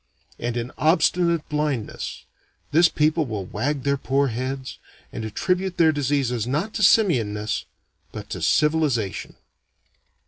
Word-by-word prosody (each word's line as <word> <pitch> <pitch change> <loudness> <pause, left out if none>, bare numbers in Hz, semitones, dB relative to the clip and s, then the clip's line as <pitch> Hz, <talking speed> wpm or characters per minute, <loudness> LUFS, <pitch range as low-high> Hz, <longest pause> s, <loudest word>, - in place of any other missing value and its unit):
And, 120 0 -2
in 120 +1 -3
obstinate 170 +1 +2
blindness, 150 -7 -3 0.5
this 170 +3 +5
people 155 0 +1
will 105 -4 -4
wag 140 +7 -2
their 140 0 +1
poor 140 +1 +1
heads, 130 +3 -4 0.3
and 115 - -5
attribute 180 - -1
their 160 -2 +5
diseases 135 -5 0
not 155 - -1
to 215 - -3
simian 165 - +4
ness 105 +1 -3 0.5
but - - -8
to - - -4
civilization. 150 - +1
140 Hz, 130 wpm, -23 LUFS, 120-160 Hz, 0.5 s, this